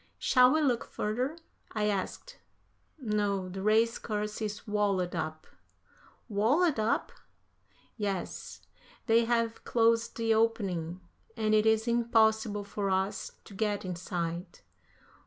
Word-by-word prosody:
"Shall 250 -1 +5
we 315 - +2
look 250 -6 +2
further?" 250 +9 -2 0.4
I 215 -1 0
asked. 210 - -3 0.6
"No, 205 -7 -1
the 190 +1 -6
race 220 +3 +3
course 210 0 -3
is 210 -1 -4
walled 200 -4 0
up." 155 -1 -4 0.8
"Walled 245 - +2
up?" 215 +1 0 0.9
"Yes, 200 -4 -4 0.4
they 230 0 +4
have 230 -1 0
closed 230 0 +2
the 225 -1 +2
opening, 190 -6 0 0.4
and 215 -1 +1
it 215 0 +4
is 220 +1 +3
impossible 220 -3 +2
for 200 0 -3
us 190 +1 -1
to - - -13
get 205 0 -1
inside." 175 -1 -4
215 Hz, 120 wpm, -30 LUFS, 195-230 Hz, 0.9 s, Shall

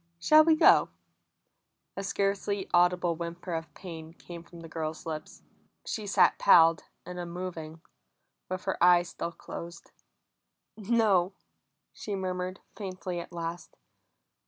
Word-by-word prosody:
Shall 305 - +6
we 320 0 +4
go?" - - +6 1.1
A 195 - -4
scarcely 200 0 -1
audible 175 -1 +3
whimper 170 +1 -6
of 165 -1 -4
pain 165 -3 -9
came 170 0 -10
from 170 0 -14
the 165 - -9
girl's 160 -1 -5
lips. 155 -1 -7 0.4
She 215 -2 -4
sat 200 - +4
palled 165 -1 +6 0.2
and 180 0 -7
unmoving, 170 -2 -6 0.7
with 185 0 -4
her 190 -3 -1
eyes 175 -1 +5
still 170 - -5
closed. 170 0 -9 0.8
"No," 205 -4 +2 0.6
she 205 - -5
murmured 185 0 -4
faintly 185 -3 -5
at 170 - -8
last. 170 0 -6
175 Hz, 125 wpm, -29 LUFS, 170-190 Hz, 1.1 s, Shall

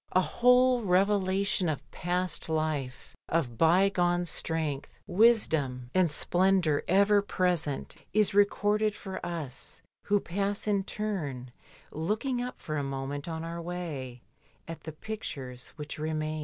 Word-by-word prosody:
A 185 - +5
whole 250 +4 +4
revelation 195 -1 +2
of 150 - -5
past 180 -1 -2
life, 155 -5 -2
of 145 -8 0
bygone 175 +1 +3
strength, 155 -3 -2 0.2
wisdom, 160 - +2
and 185 -2 +4
splendour 175 -1 +2
ever 200 +2 +5
present 180 -7 -1
is 215 0 +3
recorded 205 +1 +2
for 190 -2 -7
us 160 -7 -4 0.3
who 205 0 +3
pass 200 +2 -1
in 200 -2 +1
turn 150 -15 -4 0.4
looking 215 - -1
up 250 +1 -5
for 155 -1 -4
a 145 - -1
moment 135 +2 -4
on 160 -1 -4
our 170 +1 -5
way 155 -8 -5 0.4
at 165 0 -8
the 160 - -4
pictures 140 - -6
which 150 0 -7
remain. 155 0 -2
175 Hz, 130 wpm, -29 LUFS, 150-200 Hz, 0.4 s, A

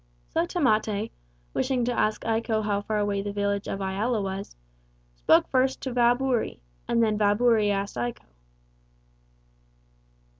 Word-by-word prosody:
So 175 - +1
Tamate, 220 - +1 0.4
wishing 250 -3 0
to 245 - 0
ask 215 -2 0
Iko 225 -1 0
how 205 -1 0
far 215 +1 -2
away 205 -1 0
the 205 0 -4
village 200 0 -1
of 195 - -4
Iala 210 +5 0
was, 195 - -5 0.6
spoke - - +4
first 260 0 +2
to 265 - -2
old 245 - -6
Vaaburi, 245 0 +2 0.3
and 235 -1 +2
then 215 -1 +1
Vaaburi 210 +1 +3
asked 200 -5 -2
Iko. 120 0 -3
215 Hz, 140 wpm, -26 LUFS, 200-235 Hz, 0.6 s, spoke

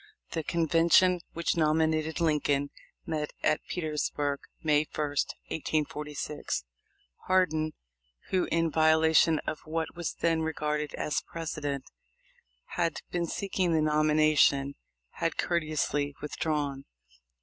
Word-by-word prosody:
The 165 - -1
convention 170 +3 +4
which 170 0 0
nominated 160 0 +1
Lincoln 145 -3 +1 0.3
met 150 -2 -3
at 155 - +2
Petersburg 150 -3 -1 0.2
May 150 -1 +3
1, - - -12
1846. 150 - -2 0.6
Hardin, 160 -4 +2 0.6
who, 185 -1 +2
in 165 -1 +1
violation 160 +1 +4
of 155 - -3
what 160 +1 -2
was 170 -2 -3
then 165 -1 +1
regarded 150 -2 -2
as 150 - -1
precedent, 150 -4 -4 1.0
had 165 -2 0
been 175 -1 -1
seeking 185 -1 -1
the 160 - +3
nomination, 150 -2 +3 0.4
had 165 -1 -1
courteously 155 -4 0
withdrawn. 145 -2 -2
155 Hz, 105 wpm, -29 LUFS, 150-165 Hz, 1.0 s, convention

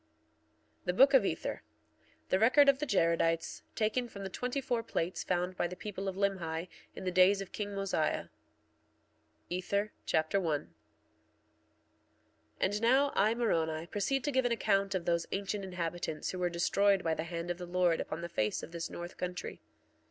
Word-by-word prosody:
THE 180 - +1
BOOK 270 +8 +6
OF 265 - +7
ETHER - - -2 0.7
The 185 - +3
record 260 +6 +6
of 275 -1 +5
the 300 - -2
Jaredites, 165 -4 +1
taken 235 +3 0
from 200 -3 -8
the 190 - -5
twenty 250 +7 -2
four 245 -3 -1
plates 180 -4 -2
found 180 0 -1
by 175 - 0
the 180 - -7
people 195 0 -5
of 190 - -2
Limhi 180 -4 -1 0.3
in - - -7
the 185 - -1
days 185 +2 +5
of 195 - -6
king 205 -1 -4
Mosiah. 195 -6 -1 1.2
Ether 200 +4 -1 0.2
Chapter 160 +5 +2
1 155 -6 0 2.0
1:1 - - -33
And 205 +2 +1
now 265 +5 +4
I, 215 +3 +3
Moroni, 165 -9 0
proceed 210 +9 -1
to 290 - 0
give 260 -1 +2
an 245 - +2
account 200 -3 +1
of 175 -2 -2
those 170 -1 +1
ancient 200 +1 -2
inhabitants 175 -3 -3
who 185 - -5
were 180 -1 +1
destroyed 195 +3 +2
by 165 - +1
the 160 +1 -3
hand 170 +1 -4
of 175 - -5
the 180 - -6
Lord 175 -2 +2
upon 160 - -5
the 170 - -4
face 110 -11 -1
of - - -8
this 170 -1 -4
north 175 +1 -7
country. 180 0 -5
185 Hz, 180 wpm, -32 LUFS, 170-210 Hz, 2.0 s, OF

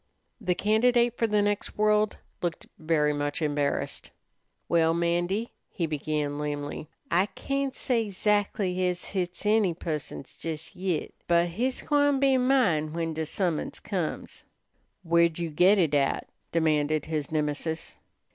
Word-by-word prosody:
The 180 -5 0
candidate 235 +3 +3
for 230 - +1
the 210 -1 +2
next 205 0 -2
world 210 0 +3 0.2
looked 170 -2 -3
very 155 -2 +2
much 145 +1 -2
embarrassed. 145 -2 -1 0.6
"Well, 165 -1 +3
'Mandy," 175 +6 0 0.2
he 175 - -2
began 150 -1 -2
lamely, 145 0 -4 0.2
"I 180 +4 +3
can't 275 +3 -3
say 230 -4 0
'zactly 200 -1 +1
ez 180 0 -4
hit's 185 0 -3
any 210 -5 +3
pusson's 155 -4 -6
jes 160 -1 -5
yit. 180 -3 -2
But 170 0 +3
hit's 245 +9 -2
gwine 290 -2 +3
be 270 -1 +4
mine 200 - +2
when 165 -1 -2
de 160 0 -3
summons 175 -2 -1
comes." - - -4 0.6
"Where'd 170 -1 +3
you 170 -2 -3
git 180 +7 +5
it 165 -6 +2
at?" 140 -1 +1 0.2
demanded 155 -2 +1
his 155 -2 -3
Nemesis. 155 +1 -2
170 Hz, 135 wpm, -27 LUFS, 155-210 Hz, 0.6 s, git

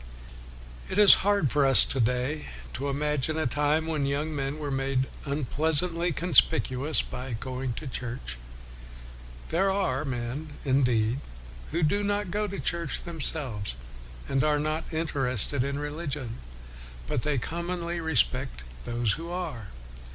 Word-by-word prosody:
It - - -3
is 210 -1 +11
hard 200 -8 +2
for 145 -1 +3
us 135 -1 +9
to 135 - -2
day 125 +6 0 0.3
to 140 +1 -3
imagine 150 +2 0
a 160 - 0
time 150 +5 +1
when 155 -4 -1
young 150 +3 -2
men 140 +1 -2
were 145 -2 -4
made 135 -1 0 0.2
un 140 0 -1
pleasantly 165 +5 +1
conspicuous 155 -3 +2
by 125 0 -6
going 130 +2 -4
to 150 - -7
church. 120 - -5 1.1
There 190 +4 +2
are 185 -9 0
men, 135 +3 -4
indeed, 125 -3 +2 0.5
who 165 +2 -1
do 200 +7 +2
not 205 -2 -1
go 210 +2 -1
to 200 0 -6
church 170 -3 -2
themselves, 140 - -1 0.5
and 135 -1 +1
are 150 -1 +2
not 155 +3 -3
interested 140 - +1
in 140 +1 -2
religion, 145 -5 -5 0.7
but 115 - -1
they 150 0 -1
commonly 170 +5 -3
respect 120 - 0 0.2
those 120 -2 0
who 165 +9 -4
are. 175 - -5
145 Hz, 140 wpm, -27 LUFS, 130-165 Hz, 1.1 s, is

